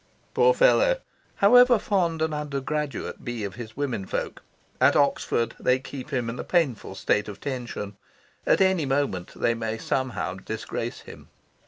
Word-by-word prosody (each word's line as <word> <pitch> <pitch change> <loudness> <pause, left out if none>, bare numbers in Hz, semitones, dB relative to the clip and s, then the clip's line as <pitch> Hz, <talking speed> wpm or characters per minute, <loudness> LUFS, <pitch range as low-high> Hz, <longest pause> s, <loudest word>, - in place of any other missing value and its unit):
Poor 475 +1 +4
fellow! - - +4 0.4
However 245 +4 +6
fond 170 -6 0
an 160 -1 -1
undergraduate 150 0 -3
be 120 -3 -4
of 100 -2 -4
his 115 0 -9
womenfolk, 125 -9 -3 0.4
at - - +5
Oxford 115 -1 +1
they 125 0 +3
keep 135 +1 -8
him 125 -5 -1
in 115 +2 -5
a - - -3
painful 140 - 0
state 105 +2 +1
of 100 -2 -8
tension: 120 -7 -5 0.5
at - - +4
any 190 -6 +3
moment 135 -10 -1
they 115 - +2
may 110 -1 -3
somehow 130 -5 -2
disgrace 110 +4 -5
him. - - -13
130 Hz, 150 wpm, -25 LUFS, 115-160 Hz, 0.5 s, However